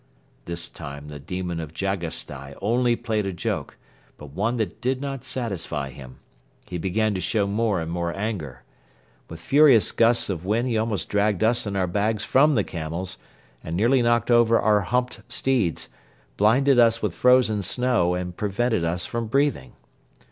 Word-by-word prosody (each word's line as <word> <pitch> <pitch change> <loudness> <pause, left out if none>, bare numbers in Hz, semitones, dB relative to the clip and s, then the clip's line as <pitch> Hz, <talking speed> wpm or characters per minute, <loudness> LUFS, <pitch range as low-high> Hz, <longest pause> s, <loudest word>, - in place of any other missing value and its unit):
This 85 -7 -4
time 70 +4 -9
the 75 -1 -8
demon 90 +2 -4
of 80 -1 -7
Jagasstai 85 -8 -4
only 120 +3 +2
played 110 -4 -2
a - - -2
joke 85 - -4 0.4
but 75 -2 -11
one 105 - -1
that 110 -6 -3
did 130 +1 0
not 135 -2 -5
satisfy 95 - -3
him. 65 0 -12 0.5
He 90 - -5
began 105 +5 0
to 95 - -3
show 100 +3 0
more 105 -1 0
and 80 0 -4
more 85 0 -2
anger. 85 - -4 0.7
With 80 - -9
furious 135 - +5
gusts 115 +1 +3
of 90 -4 -4
wind 110 +6 0
he 115 - 0
almost 110 -6 -1
dragged 105 -1 +1
us 115 0 +2
and 100 -1 -2
our 95 - +2
bags 105 +4 -1
from 150 +2 +4
the 105 - +2
camels 85 +3 -5 0.4
and 80 +2 -4
nearly 120 +6 +3
knocked 120 0 +2
over 115 -1 +5
our 105 -1 +3
humped 125 +6 -1
steeds, 120 -8 0 0.5
blinded 130 +5 +4
us 115 -1 +4
with 105 -5 0
frozen 125 -1 +3
snow 95 -2 +1
and 90 -1 -4
prevented 105 0 0
us 85 +2 -2
from 115 -1 -3
breathing. 135 - 0
105 Hz, 170 wpm, -24 LUFS, 85-120 Hz, 0.7 s, furious